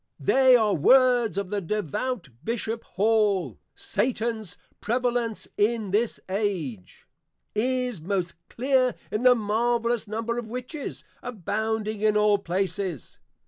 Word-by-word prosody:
They 260 -1 +5
are 215 -4 +3
words 245 - +4
of 200 -1 -3
the 205 -1 -1
Devout 210 - -3
Bishop 230 +2 -3
Hall, 210 -2 +2 0.2
_Satans 225 -6 -2 0.2
prevalency 240 -1 -1
in 215 -1 +1
this 220 +3 +1
Age, 185 - -3 0.5
is 250 -3 -1
most 180 0 -2 0.2
clear 255 0 +1 0.2
in 215 - -1
the 250 0 +6
marvellous 235 +1 0
Number 225 +3 -2
of 235 - -6
Witches, 250 +5 -6 0.2
abounding 220 -1 -2
in 215 -1 +3
all 210 -1 +4
places. 185 - -3
220 Hz, 115 wpm, -26 LUFS, 200-240 Hz, 0.5 s, the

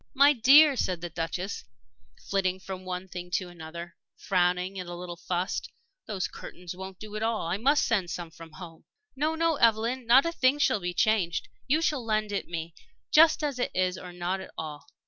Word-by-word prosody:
"My 285 +2 +7
dear," 280 +4 +7
said 185 -7 -1
the 175 -1 -5
Duchess, 175 +4 -4 0.6
flitting 190 -1 0
from 190 -1 -8
one 185 0 -4
thing 180 -1 -7
to 185 - -2
another, 170 0 -9 0.2
frowning 180 0 0
and 180 -1 -6
a 175 - -5
little 175 0 -7
fussed, 175 +2 -3 0.4
"those 195 -4 -2
curtains 180 0 -9
won't 190 0 -8
do 215 +1 -9
at 215 - -3
all. 225 0 0
I 170 +3 -1
must 280 +7 +3
send 195 -7 0
some 170 0 -5
from 160 0 -13
home." 165 0 -11 0.3
"No, 305 +4 0
no, 330 -1 +1
Evelyn. 230 +2 +2
Not 260 +5 +7
a 335 - 0
thing 270 -3 +2
shall 290 -7 +2
be 175 -1 -4
changed. 215 -7 +1 0.2
You 310 +5 +2
shall 295 -6 0
lend 215 -2 0
it 200 - -2
me 165 -1 -5 0.4
just 310 0 +6
as 280 -4 -2
it 245 - 0
is 185 0 +1
or 180 -1 -9
not 180 +2 -2
at - - -9
all. 150 -2 -7
190 Hz, 200 wpm, -28 LUFS, 175-240 Hz, 0.6 s, My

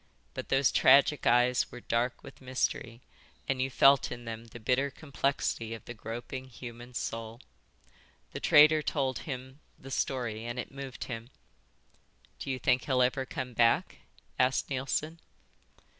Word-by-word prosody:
But - - -6
those 135 0 +3
tragic 140 +2 +5
eyes 120 +1 +3
were 125 - -8
dark 120 +2 -1
with 135 - -13
mystery, 125 -2 -2 0.5
and 135 -1 0
you 130 - 0
felt 135 +1 +5
in 120 0 -7
them 115 0 -6
the 115 +1 -11
bitter 130 +5 +1
complexity 135 -5 -2
of 115 - -13
the 120 - -7
groping, 120 +4 -6
human 120 0 -10
soul. 115 0 -4 0.9
The - - -5
trader 155 +1 +6
told 135 -4 -1
him 130 +1 -6 0.2
the 135 - -11
story 120 -5 -2
and 120 +1 -5
it 125 - -5
moved 135 -2 -7
him. 115 -1 -7 1.1
"Do - - -6
you 130 - -1
think 125 0 +1
he'll 130 -2 +3
ever 130 +1 0
come 130 -4 -5
back?" 115 0 +2 0.4
asked 130 +2 +2
Neilson. 145 +5 -2
125 Hz, 150 wpm, -30 LUFS, 120-135 Hz, 1.1 s, trader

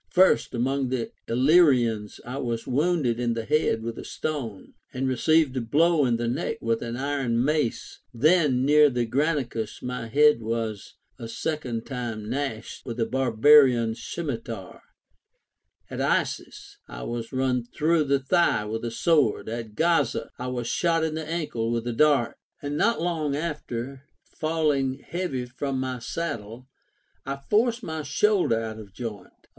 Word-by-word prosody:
First, 185 -7 +3
among 130 +2 0
the 125 -2 -2 0.2
Illyrians 125 - +3
I 125 +2 -5
was 120 -4 -3
wounded 140 -3 +1
in 120 -1 0
the 115 -1 -3
head 115 -5 +1
with 115 0 -5
a - - -6
stone, 130 -11 -5 0.2
and 130 +1 -2
received 140 +2 +2
a 130 - 0
blow 150 +4 +3
in 120 -1 +1
the 120 0 -2
neck 120 - -2
Avith 115 0 -1
an 120 0 -4
iron 130 -4 0
mace. 150 -5 -1
Then, 140 0 +3
near 150 +1 +6
the 125 -2 -1
Granicus 130 -4 -1
my 125 -2 -4
head 150 +1 +4
was 110 -2 -4 0.2
a 115 - -6
second 120 -2 -3
time 120 -5 -5
gashed 125 -5 -4
with 120 -1 -6
a 115 - +2
barbarian 125 0 +5
scimitar; 115 - -6 1.1
at - - -7
Issus - - -2
I - - -8
was 115 - -5
run 130 -2 0
through 155 +6 +1
the 140 0 +3
thiah 135 -5 +2
with 110 +2 -4
a 120 - -1
sword; 115 - +2
at 115 -2 -6
Gaza 165 +3 +1
I 125 - -4
was 125 -2 -3
shot 165 +5 +1
in 160 -1 -1
the 155 0 -5
ankle 150 -9 -2
with 115 0 -1
a 120 - -2
dart; 140 -2 +3 0.2
and 145 0 -4
not 230 +9 +2
long 160 -4 -1
after, 140 -4 -5 0.2
falling 150 -5 0
heavy 150 -5 -4
from 130 +2 -3
my 130 -1 -3
saddle, 120 -4 -5 0.6
I 135 +1 -3
forced 225 - +1
my 160 -3 -4
shoulder 165 - +2
out 110 -1 -5
of 100 -3 -12
joint. 110 -4 -6
130 Hz, 155 wpm, -26 LUFS, 115-150 Hz, 1.1 s, near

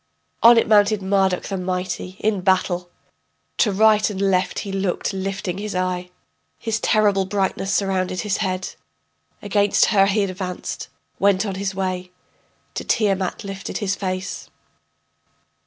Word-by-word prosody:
On 235 +1 +8
it 230 - +3
mounted 210 -1 +4
Marduk 190 -1 +1
the 195 - -4
mighty 185 0 -3
in 210 -3 +1
battle. 180 -1 +1 0.7
To 215 - +4
right 215 +2 +4
and 200 -2 -5
left 190 -2 +1
he 200 - -5
looked, 195 0 -1
lifting 195 -1 -3
his 210 -1 -4
eye. 180 0 -2 0.5
His 220 -1 -2
terrible 205 -4 +2
brightness 195 0 -1
surrounded 185 -2 0
his 205 -2 -1
head. 185 -3 -2 0.7
Against 205 0 +3
her 195 -1 +5
he 205 +1 +2
advanced, 185 -1 -5 0.3
went 200 +1 +3
on 200 - -3
his 195 0 -3
way, 185 -1 -2 0.6
To - - -4
Tiamat 195 -4 0
lifted 195 -1 -5
his 200 -2 -1
face. 185 -1 -4
195 Hz, 140 wpm, -22 LUFS, 185-205 Hz, 0.7 s, On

